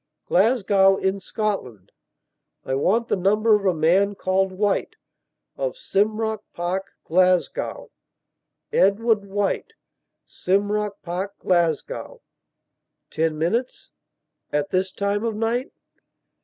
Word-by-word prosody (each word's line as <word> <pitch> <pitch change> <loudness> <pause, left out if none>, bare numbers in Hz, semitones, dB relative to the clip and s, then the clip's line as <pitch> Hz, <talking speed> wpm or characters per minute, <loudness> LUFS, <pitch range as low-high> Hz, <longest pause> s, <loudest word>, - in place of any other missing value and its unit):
Glasgow, 195 -2 +3
in 190 +1 -1
Scotland.. 180 - -4 0.7
I - - -2
want 205 - +1
the - - +1
number 210 +4 +3
of 200 -1 0
a 185 - +3
man 195 +6 +3
called 190 0 0
White, 200 +1 -1 0.6
of - - -2
Simrock 220 - 0 0.2
Park, 180 +3 -3
Glasgow... 185 - +1 0.8
Edward 210 +2 +3
White, 205 - -2 0.5
Simrock 205 +2 -1
Park, 190 +4 -4
Glasgow... 170 -4 -1 0.9
ten 160 0 0
minutes... 225 +11 -2 0.6
at 145 0 -1
this 185 0 0
time 200 +1 -1
of 225 -2 -1
night..." 230 +4 -1
195 Hz, 100 wpm, -23 LUFS, 185-215 Hz, 0.9 s, Glasgow